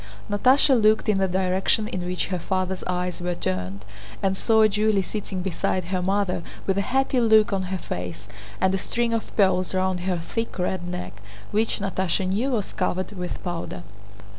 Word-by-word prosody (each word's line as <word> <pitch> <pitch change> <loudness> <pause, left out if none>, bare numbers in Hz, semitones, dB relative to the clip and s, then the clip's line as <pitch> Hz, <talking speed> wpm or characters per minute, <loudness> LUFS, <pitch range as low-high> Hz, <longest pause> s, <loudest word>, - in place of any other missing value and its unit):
Natásha 255 +4 +5
looked 215 +1 +4
in 200 -2 +3
the 190 - +2
direction 190 +3 +1
in 185 -4 -3
which 180 +1 -2
her 180 -2 -1
father's 185 +1 -1
eyes 180 0 -2
were 175 0 -1
turned 95 - -3 0.4
and 190 -1 +2
saw 220 +2 +4
Julie 210 -1 +2
sitting 190 -2 -4
beside 185 0 -1
her 185 +1 -1
mother 190 -1 0 0.2
with 195 0 +1
a 200 - -2
happy 265 0 +2
look 220 -3 +5
on 190 -1 0
her 190 - -1
face 90 - -6 0.3
and 190 0 +3
a 190 - +1
string 235 +4 -1
of 225 - -2
pearls 190 -2 +3
round 185 -1 +1
her 180 0 -1
thick 225 +8 -4
red 180 -1 -1
neck—which 105 - -3
Natásha 190 -1 0
knew 210 +8 0
was 225 -7 -1
covered 185 0 -1
with 180 -3 -5
powder. 165 - -4
190 Hz, 175 wpm, -25 LUFS, 180-210 Hz, 0.4 s, Natásha